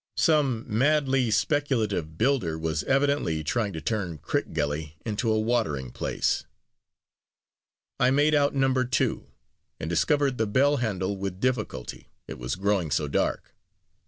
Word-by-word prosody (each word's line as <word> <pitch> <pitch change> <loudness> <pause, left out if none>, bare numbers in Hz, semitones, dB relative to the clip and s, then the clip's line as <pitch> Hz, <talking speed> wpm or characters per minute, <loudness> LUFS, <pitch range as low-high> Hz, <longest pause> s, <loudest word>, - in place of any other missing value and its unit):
Some 140 -8 +2
madly 135 +1 +2
speculative 110 - 0
builder 110 - +1
was 80 -1 -2
evidently 135 - +1
trying 105 +6 -1
to 80 - -5
turn 95 -8 -2
Crickgelly 75 +1 -2
into 110 +1 0
a 110 - +2
watering 110 - -1
place. - - -1 1.6
I 125 - +4
made 145 +3 +3
out 145 -1 +3
Number 135 -1 +2
Two, 130 +1 -1 0.5
and - - -4
discovered 135 - +1
the 110 - +1
bell 140 +7 +3
handle 100 -4 -1
with 95 -1 -4
difficulty, 110 - -3 0.2
it - - -8
was - - -3
growing 95 -3 0
so 75 +1 0
dark. 70 - -1
110 Hz, 130 wpm, -26 LUFS, 80-135 Hz, 1.6 s, I